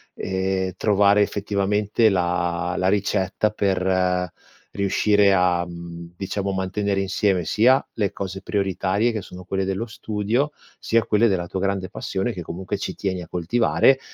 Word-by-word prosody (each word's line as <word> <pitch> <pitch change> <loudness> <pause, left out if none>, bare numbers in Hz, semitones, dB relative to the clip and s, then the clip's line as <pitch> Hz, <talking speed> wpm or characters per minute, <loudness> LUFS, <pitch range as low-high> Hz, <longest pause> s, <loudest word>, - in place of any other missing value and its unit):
ehm, 95 0 -1
trovare 100 +1 +4
effettivamente 105 +2 +1
la 90 -1 0
la 95 - +1
ricetta 100 0 +1
per 90 -3 0 0.4
riuscire 100 +1 +3
a, 90 -2 +3
mhmm, 85 0 -9
diciamo, 100 +1 -2
mantenere 95 +1 -1
insieme, 95 -2 +1
sia 125 - +4
le 105 -3 -1
cose 95 0 -5
prioritarie, 100 +3 0
che 110 -3 -3
sono 90 0 -11
quelle 95 +1 -2
dello 95 +4 -2
studio, 110 +5 -1 0.3
sia 115 0 +2
quelle 115 +1 +3
della 95 -5 0
tua 95 +2 -4
grande 95 -1 -1
passione, 95 +6 -3
che 90 - -6
comunque 90 +4 -5
ci - - -4
tieni 95 -2 -2
a 85 - -9
coltivare 115 +9 +2
95 Hz, 145 wpm, -23 LUFS, 90-105 Hz, 0.4 s, trovare